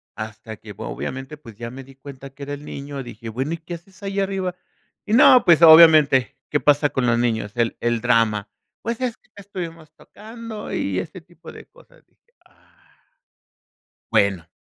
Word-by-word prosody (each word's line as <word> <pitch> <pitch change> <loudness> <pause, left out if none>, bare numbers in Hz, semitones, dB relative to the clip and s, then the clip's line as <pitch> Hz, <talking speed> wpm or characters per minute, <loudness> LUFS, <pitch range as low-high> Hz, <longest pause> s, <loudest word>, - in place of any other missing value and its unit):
Hasta 110 +1 -8
que, 105 -1 -11
obviamente, 135 +3 -6
pues 115 -7 -14
ya 115 +2 -7
me 135 +1 -9
di 135 0 -17
cuenta 135 0 -11
que 135 +1 -12
era 145 +1 -5
el 145 0 -8
niño. 140 -1 -7
Dije: 115 -1 -9
"Bueno, 130 +8 -3
¿y 170 - -3
qué 165 +2 -9
haces 190 +4 -16
ahí 195 0 -3
arriba?" 190 -2 -2 0.5
Y 210 - -3
no, 255 0 +7
pues 170 -2 +5
obviamente, 155 -5 +7
¿qué 145 - +1
pasa 145 0 +3
con 130 -3 -1
los 120 - +2
niños? 110 -4 -1
El 120 -1 -1
el 120 -1 -1
drama. 110 -4 +1 0.3
Pues 235 +1 -4
es 250 -3 -2
que - - -35
estuvimos 170 -6 -8
tocando 225 0 -10
y - - -1
este - - -8
tipo - - -15
de - - -13
cosas, - - -22
dije: 480 - -42
"Ah". - - -30 1.1
Bueno, 100 -5 +1
145 Hz, 180 wpm, -21 LUFS, 120-185 Hz, 1.1 s, no